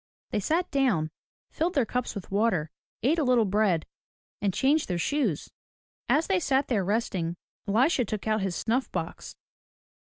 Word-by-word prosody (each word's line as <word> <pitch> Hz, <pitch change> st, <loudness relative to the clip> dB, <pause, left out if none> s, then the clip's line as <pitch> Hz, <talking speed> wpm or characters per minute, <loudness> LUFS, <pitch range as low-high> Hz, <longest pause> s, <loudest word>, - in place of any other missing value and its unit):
They -, -, +1 dB
sat 330 Hz, -, 0 dB
down, 230 Hz, -, +2 dB, 0.4 s
filled 335 Hz, +2 st, -1 dB
their 270 Hz, -5 st, +3 dB
cups 250 Hz, +1 st, -2 dB
with 200 Hz, -, -7 dB
water, 195 Hz, -7 st, +1 dB, 0.3 s
ate 305 Hz, +7 st, +3 dB
a -, -, +2 dB
little 250 Hz, -4 st, +4 dB
bread, 195 Hz, -5 st, +2 dB, 0.6 s
and 200 Hz, -1 st, +2 dB
changed 280 Hz, -, +2 dB
their 180 Hz, -, -1 dB
shoes. 220 Hz, -, -1 dB, 0.6 s
As 315 Hz, -, +3 dB
they 385 Hz, -2 st, +2 dB
sat 275 Hz, -3 st, +1 dB
there 215 Hz, -6 st, +2 dB
resting, 185 Hz, -4 st, -1 dB, 0.3 s
Elisha 250 Hz, +6 st, +3 dB
took 215 Hz, -1 st, -4 dB
out 215 Hz, -1 st, +2 dB
his 190 Hz, -2 st, -1 dB
snuff 240 Hz, +8 st, 0 dB
box. -, -, -5 dB
225 Hz, 160 wpm, -27 LUFS, 195-275 Hz, 0.6 s, little